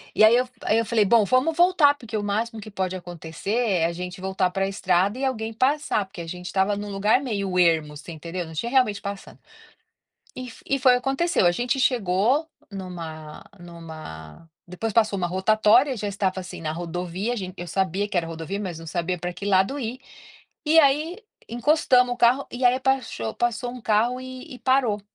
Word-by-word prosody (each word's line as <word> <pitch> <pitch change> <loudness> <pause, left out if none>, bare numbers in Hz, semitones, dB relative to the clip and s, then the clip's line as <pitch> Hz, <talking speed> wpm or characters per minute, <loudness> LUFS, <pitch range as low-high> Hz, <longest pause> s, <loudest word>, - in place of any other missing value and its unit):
e - - +5
aí 220 +2 +8
eu 250 +1 +2
aí 215 - +2
eu 230 - +1
falei: 220 -2 +2
"Bom, 220 0 +4
vamos 255 +8 +2
voltar, 345 -5 +5
porque 235 -5 -8
o 205 - -1
máximo 220 +2 -2
que 215 - -9
pode 190 -2 -3
acontecer 175 +1 -7
é 200 -9 +2
a 170 - 0
gente 180 +1 -7
voltar 190 -1 0
para 195 +1 0
estrada 195 +2 +1
e 270 - -1
alguém 225 -4 -2
passar", 265 -3 +1
porque 190 -2 -10
a 165 - -8
gente 180 +1 -7
estava 190 +3 +1
em 205 +1 -5
um - - -7
lugar 205 +5 +2
meio 200 -7 -2
ermo, 160 -4 +2
você 155 - -10
entendeu, 170 +2 -5
não 160 - -10
tinha 235 +10 -3
realmente 235 -7 +2
passando. 200 0 -7 1.0
E 255 - -5
f - - -13
e 275 - +1
foi 255 -1 +5
o - - +2
aconteceu, 270 - +1
a - - +6
gente 245 +7 -1
chegou 245 - +2 0.2
numa 165 -5 -8
numa 160 - -11 0.2
depois 200 +5 -4
passou 215 -2 +2
uma 175 - 0
rotatória, 215 +8 +3
já 210 -1 -3
estava, 190 -2 -1
assim, 180 -2 -9
na 155 0 -2
rodovia, 175 +6 -3
a - - -6
gente 185 -3 -5
eu 175 - -5
sabia 190 +3 -1
que 200 - -4
era 165 -1 +1
rodovia, 165 +4 -5
mas 180 -5 -5
não 165 - -10
sabia 175 +2 -2
pra 175 +1 -4
que 200 - -9
lado 195 +7 +2
ir. 250 +1 -4 0.7
E 320 +2 +5
aí, 305 +6 +2 0.3
encostamos 250 0 +3
o - - -13
carro, 245 +3 +3
e 250 +1 -3
aí 250 +1 +4
paxo 265 - -1
passou 240 +1 -1
um 250 - -9
carro 230 +4 +1
e 260 +2 -9
e - - -11
parou. 250 -6 +2
205 Hz, 210 wpm, -24 LUFS, 180-250 Hz, 1.0 s, aí